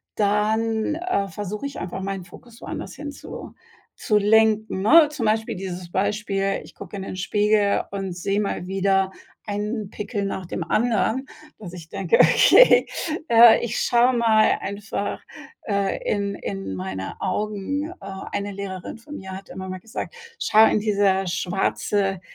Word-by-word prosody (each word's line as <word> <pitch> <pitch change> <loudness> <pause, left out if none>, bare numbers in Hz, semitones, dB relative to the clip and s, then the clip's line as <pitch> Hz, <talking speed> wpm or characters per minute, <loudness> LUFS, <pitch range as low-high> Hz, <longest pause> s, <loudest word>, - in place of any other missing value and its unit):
dann, 220 +5 +1
äh, 330 - -1
versuche 210 +5 -5
ich 280 - -8
einfach 180 +2 -5
meinen 195 -2 -4
Fokus 235 +6 -15
woanders - - -6
hinzu 290 0 -8
zu - - -9 0.5
zu 210 - +2
lenken, 220 -1 +3
ne? 300 +9 +7
Zum 270 -7 -3
Beispiel 220 -1 0
dieses 180 -2 -6
Beispiel, 195 0 -1
ich - - -15
gucke 200 +1 -10
in 195 - -5
den 190 - -6
Spiegel 205 +1 +2
und 195 -2 -4
sehe 195 +3 -1
mal 200 -3 -2
wieder 195 0 +1 0.3
einen 210 0 -3
Pickel 210 0 -4
nach 190 -1 -3
dem 170 - -4
anderen, 230 +6 +1 0.3
dass 180 -5 -10
ich 165 -3 -10
denke: 195 -3 +1
„Okay, - - +7 0.4
äh, 230 0 +8
ich 235 - -3
schau 245 +2 +3
mal 225 -3 +4
einfach, 200 +1 -4 0.5
äh, 200 -2 0
in 200 -1 -1
in 95 -1 -5
meine 95 +1 -5
Augen.“ 215 - -2
Äh, - - -12 0.3
eine 205 0 -3
Lehrerin 195 +2 -6
von 295 +6 -9
mir 190 0 -9
hat 195 - -10
immer 190 0 -7
mal 185 0 -6
gesagt: 225 - -6 0.2
„Schau 220 +1 +5
in - - +2
dieser 200 -2 +1
schwarze, 195 +2 -1
205 Hz, 155 wpm, -23 LUFS, 190-220 Hz, 0.5 s, äh